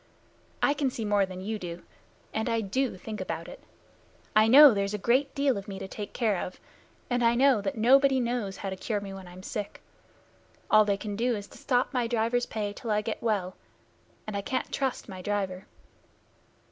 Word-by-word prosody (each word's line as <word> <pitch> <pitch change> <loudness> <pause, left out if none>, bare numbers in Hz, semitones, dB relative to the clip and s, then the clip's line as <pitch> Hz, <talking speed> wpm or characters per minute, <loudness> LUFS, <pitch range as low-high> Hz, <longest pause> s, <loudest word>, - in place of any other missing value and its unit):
"I 285 - +4
can 285 -2 0
see 230 -3 -5
more 205 -2 +2
than 185 0 -8
you, 185 -4 -5 0.5
and 220 +2 -1
I 230 0 +1
do 225 +2 -1
think 215 +3 -6
about - - -4
it. - - -11 0.7
I 215 +1 +6
know 280 +2 +9
there's 200 0 -1
a - - -2
great 260 +7 +1
deal 275 -6 +2
of 200 - -11
me 195 -2 -6
to 190 - -6
take 205 +1 -7
care 220 -5 0
of, 180 - -8 0.5
and 245 -1 0
I 230 0 +4
know 260 -3 +4
that 200 +2 -3
nobody 265 +4 +5
knows 235 -5 -2
how 195 - -4
to - - -3
cure 210 +2 -2
me 200 -1 -7
when 190 -1 -9
I'm 180 +1 -12
sick. 205 0 -5 0.9
All 215 0 +7
they 200 -1 +1
can 205 0 -5
do 240 +2 +1
is 205 -1 -6
to - - -14
stop 250 0 +1
my 245 -2 +1
driver's 235 +1 0
pay 210 -2 -3
till 230 - -7
I 210 0 +2
get 220 +1 -4
well, 200 -5 -1 0.7
and 215 - -5
I 200 - -1
can't 255 +6 -3
trust 265 -3 -2
my 190 -3 -8
driver." 195 -1 -3
215 Hz, 205 wpm, -28 LUFS, 200-245 Hz, 0.9 s, know